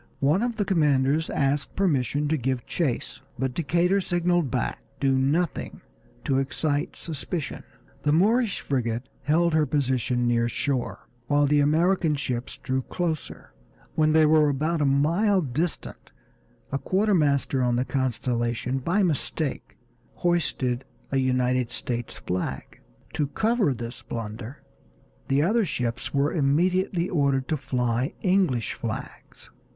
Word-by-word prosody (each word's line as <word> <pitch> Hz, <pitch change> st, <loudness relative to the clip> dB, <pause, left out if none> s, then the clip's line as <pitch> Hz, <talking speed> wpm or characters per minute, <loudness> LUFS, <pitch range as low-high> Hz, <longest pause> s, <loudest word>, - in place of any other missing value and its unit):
One 150 Hz, +8 st, +3 dB
of 240 Hz, -1 st, -1 dB
the 210 Hz, -2 st, -1 dB
commanders 150 Hz, -4 st, +2 dB
asked 140 Hz, 0 st, 0 dB
permission 145 Hz, -5 st, +1 dB
to 160 Hz, -, +2 dB
give 130 Hz, -3 st, -2 dB
chase, 145 Hz, -9 st, -2 dB, 0.2 s
but 130 Hz, 0 st, -1 dB
Decatur 175 Hz, +6 st, +2 dB
signaled 175 Hz, -4 st, +1 dB
back 125 Hz, -1 st, -2 dB, 0.2 s
"Do 135 Hz, -1 st, +2 dB
nothing 140 Hz, +7 st, 0 dB, 0.4 s
to 135 Hz, -1 st, +1 dB
excite 145 Hz, +2 st, -1 dB
suspicion." 160 Hz, 0 st, -4 dB, 0.4 s
The 145 Hz, -, +1 dB
Moorish 210 Hz, +6 st, +2 dB
frigate 120 Hz, -2 st, -2 dB
held 170 Hz, +2 st, +2 dB
her 155 Hz, -1 st, +3 dB
position 125 Hz, -3 st, 0 dB
near 120 Hz, 0 st, +2 dB
shore 130 Hz, +1 st, -2 dB, 0.2 s
while 145 Hz, +1 st, +3 dB
the 145 Hz, +1 st, +3 dB
American 160 Hz, +2 st, +3 dB
ships 125 Hz, -3 st, -3 dB
drew 130 Hz, 0 st, 0 dB
closer. 160 Hz, +2 st, -4 dB, 0.4 s
When 155 Hz, -1 st, +3 dB
they 155 Hz, 0 st, +5 dB
were 155 Hz, -1 st, +5 dB
about 155 Hz, +4 st, 0 dB
a -, -, +3 dB
mile 165 Hz, +9 st, +3 dB
distant 155 Hz, +2 st, -3 dB, 0.6 s
a 135 Hz, -, -1 dB
quartermaster 155 Hz, -10 st, +2 dB
on 125 Hz, -1 st, +2 dB
the 125 Hz, +2 st, 0 dB
Constellation, 125 Hz, -1 st, -1 dB
by 175 Hz, +10 st, +1 dB
mistake, 155 Hz, -3 st, -2 dB, 0.4 s
hoisted 135 Hz, -8 st, 0 dB, 0.3 s
a 135 Hz, -, +1 dB
United 125 Hz, -2 st, +1 dB
States 120 Hz, -1 st, -3 dB
flag. 90 Hz, +1 st, -4 dB, 0.3 s
To 150 Hz, -, 0 dB
cover 220 Hz, -, +1 dB
this 120 Hz, -1 st, -6 dB
blunder 115 Hz, +3 st, -7 dB, 0.6 s
the 140 Hz, +2 st, +2 dB
other 220 Hz, +7 st, +3 dB
ships 120 Hz, -, -2 dB
were 140 Hz, +1 st, +1 dB
immediately 175 Hz, +4 st, +1 dB
ordered 140 Hz, -6 st, +1 dB
to 155 Hz, -, +2 dB
fly 125 Hz, -2 st, -1 dB
English 180 Hz, -, +2 dB
flags. -, -, -7 dB
145 Hz, 130 wpm, -25 LUFS, 130-170 Hz, 0.6 s, they